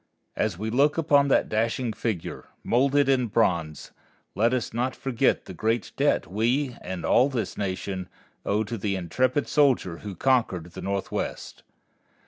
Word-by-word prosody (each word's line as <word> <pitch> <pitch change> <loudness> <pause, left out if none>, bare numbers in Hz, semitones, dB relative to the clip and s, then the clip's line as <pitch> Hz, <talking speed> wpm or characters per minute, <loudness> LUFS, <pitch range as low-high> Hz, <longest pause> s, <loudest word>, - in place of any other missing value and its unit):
As - - -1
we 110 +3 -3
look 145 +6 +3
upon 145 -3 +4
that 140 - +3
dashing 115 +2 -1
figure, 105 -8 -4 0.2
moulded 140 +3 +3
in 130 -3 +2
bronze, 85 -8 0 0.4
let 115 +5 +2
us 125 -3 -2
not 125 +3 -1
forget 135 -1 0
the 95 - -8
great 110 +3 -1
debt - - +2
we 120 +6 0
and 90 -1 -5
all 130 +3 +4
this 125 -5 -3
Nation 95 -1 -4 0.3
owe 105 +2 +1
to 110 +1 -5
the 100 0 -1
intrepid 125 - 0
soldier 130 - +2
who 100 -3 -7
conquered 95 -8 +1
the - - -8
Northwest. 100 0 -4
115 Hz, 150 wpm, -26 LUFS, 95-130 Hz, 0.4 s, upon